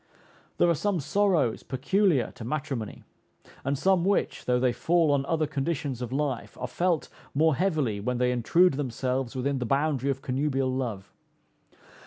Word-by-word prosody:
There - - +4
are 170 - +4
some 180 +4 0
sorrows 170 - +1
peculiar 140 - +1
to - - -10
matrimony; 135 -3 -4 0.6
and 140 +1 0
some 185 +3 +3
which, 200 +2 0
though 125 0 +2
they 125 -1 +2
fall 165 0 +2
on 140 -1 +1
other 160 -1 +1
conditions 140 -3 -3
of 125 -1 -4
life, 135 -2 -2
are - - -2
felt 170 +5 0 0.3
more 160 +2 +4
heavily 155 - 0
when 125 +4 -2
they 125 0 +2
intrude 155 +9 +3
themselves 130 -1 -2
within 135 +1 -1
the 125 - -2
boundary 140 0 +1
of 135 0 -2
connubial 135 0 0
love. 115 -7 -4
140 Hz, 160 wpm, -27 LUFS, 125-160 Hz, 0.6 s, There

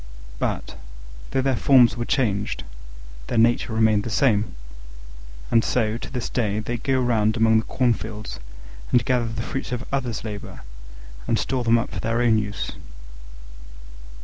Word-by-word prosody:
But, - - -3 0.5
though 130 - 0
their 135 -1 +2
forms 125 -2 +5
were 120 -1 -3
changed, 105 -8 0 0.6
their - - -2
nature 115 +1 +3
remained 110 -2 +3
the 115 - -4
same: 110 - +1 1.0
and 115 - +4
so, 110 -3 0
to - - -8
this 125 -3 -3
day, 105 -4 -1
they 120 +3 -3
go 130 +2 0
about 110 -2 +2
among 110 0 +4
the 110 - -5
cornfields 110 -4 -2 0.5
and 120 -2 +3
gather 125 -2 +1
the 115 +1 -4
fruits 135 +2 -4
of 125 -2 -3
others' 125 -5 -2
labour, 105 -2 -7 0.7
and - - +2
store 130 -2 -1
them 115 0 +4
up 115 - -2
for - - -5
their 115 +1 -1
own 115 -3 +4
use. 105 -1 -4
115 Hz, 155 wpm, -23 LUFS, 110-125 Hz, 1.0 s, forms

